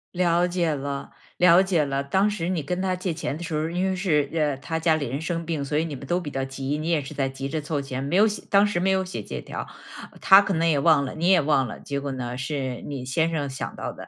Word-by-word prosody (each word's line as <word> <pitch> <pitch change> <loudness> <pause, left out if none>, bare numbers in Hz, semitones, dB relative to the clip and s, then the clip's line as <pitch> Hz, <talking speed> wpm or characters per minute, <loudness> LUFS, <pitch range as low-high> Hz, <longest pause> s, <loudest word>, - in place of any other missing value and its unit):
了 175 0 +3
解 175 -3 0
了， 140 -1 -5 0.2
了 180 0 +6
解 185 -5 +2
了。 140 -1 -1
当 190 +9 +2
时 180 -5 -3
你 175 -4 -1
跟 180 +6 -2
他 185 -1 0
借 180 -1 -3
钱 155 -2 -4
的 175 - -7
时 165 -2 -5
候 150 - +1
儿， 165 +1 -3
因 180 +1 0
为 - - 0
是， 150 -7 +1
呃， 150 -3 +1
他 160 +5 -4
家 160 -1 +3
里 145 -3 -2
人 135 - -3
生 165 +1 -3
病， 160 -3 -2
所 150 +2 -1
以 155 - +2
你 165 -3 -5
们 140 0 -8
都 175 +4 0
比 145 -4 -6
较 135 0 -2
急， 135 +2 -3
你 155 +2 -3
也 165 -3 +2
是 135 - -8
在 135 -1 0
急 135 +1 -5
着 155 +2 -2
凑 150 -1 -2
钱， 130 -1 -5
没 140 +6 -2
有 205 - +6
写 210 -1 -1
当 200 +1 +5
时 205 -4 0
没 185 +2 +1
有 190 0 +2
写 185 - -5
借 - - -6
条。 - - -6 0.5
他 195 +1 +8
可 195 -1 -1
能 165 0 +2
也 150 -3 +2
忘 140 0 +4
了， 135 - -5
你 165 +2 0
也 185 -2 +6
忘 140 -3 +2
了， - - -8
结 140 -1 -3
果 140 -1 -4
呢， 125 -1 -4
是 130 -2 -3
你 140 -3 -5
先 160 +6 +1
生 150 -4 -2
想 130 - -5
到 - - -4
的。 - - -11
155 Hz, 310 characters per minute, -25 LUFS, 140-175 Hz, 0.5 s, 他